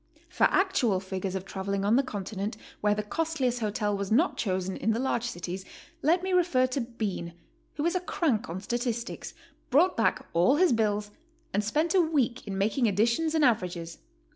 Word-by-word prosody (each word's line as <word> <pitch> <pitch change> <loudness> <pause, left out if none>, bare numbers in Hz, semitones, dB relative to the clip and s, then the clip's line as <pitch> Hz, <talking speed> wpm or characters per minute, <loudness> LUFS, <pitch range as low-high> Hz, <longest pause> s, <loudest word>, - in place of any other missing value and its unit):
For - - +3
actual 280 - +2
figures 190 0 -4
of 190 0 -4
traveling 195 0 -3
on 210 +3 +4
the 270 - +5
Continent 205 -3 -4 0.2
where 210 0 +2
the 210 - -2
costliest 265 -1 -1
hotel 210 -1 -1
.was 200 0 -4
not 300 +11 +3
chosen 190 -2 -1
in 225 - 0
the 225 - -1
large 255 -2 0
cities,' 185 -4 -5 0.4
let 340 +4 +3
me 380 0 -1
refer 340 -8 +3
to 255 +1 -2
Bean, 210 -8 -4 0.4
who 295 - -2
is 340 - +2
a 365 - +1
crank 330 - -1
on 170 +3 -4
statistics, 240 +2 -3 0.3
brought 335 +8 +4
back 225 - +1
all 175 +11 +4
his 350 -2 +4
bills, 210 -2 0 0.4
and 210 - +1
spent 305 +10 +1
a 375 - +5
week 270 -8 0
in 195 -1 -3
making 220 +5 +2
additions 235 - +1
and 310 -2 +4
averages. 180 -8 -1
225 Hz, 185 wpm, -28 LUFS, 200-285 Hz, 0.4 s, the